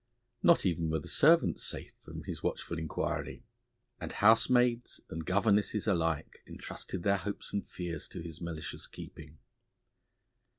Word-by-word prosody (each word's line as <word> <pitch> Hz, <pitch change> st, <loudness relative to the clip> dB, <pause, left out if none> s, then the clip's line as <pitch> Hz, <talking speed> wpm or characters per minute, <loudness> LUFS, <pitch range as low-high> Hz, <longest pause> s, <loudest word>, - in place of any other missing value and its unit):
Not 170 Hz, -9 st, +5 dB
even 85 Hz, -3 st, +1 dB
were 80 Hz, -, +1 dB
the 75 Hz, -, -7 dB
servants -, -, +4 dB
safe -, -, -6 dB
from -, -, -8 dB
his -, -, -5 dB
watchful 85 Hz, -, -2 dB
inquiry, 80 Hz, -1 st, -3 dB, 0.6 s
and -, -, -5 dB
housemaids 120 Hz, +2 st, +4 dB
and 80 Hz, 0 st, -4 dB
governesses 105 Hz, +3 st, +2 dB
alike 80 Hz, -6 st, 0 dB
entrusted 90 Hz, -, -6 dB
their 100 Hz, +1 st, +3 dB
hopes 100 Hz, +3 st, -5 dB
and 100 Hz, -, -2 dB
fears 85 Hz, -4 st, -5 dB
to -, -, -8 dB
his 85 Hz, 0 st, -8 dB
malicious 85 Hz, -2 st, -5 dB
keeping. 80 Hz, 0 st, -11 dB
90 Hz, 135 wpm, -32 LUFS, 80-105 Hz, 0.6 s, Not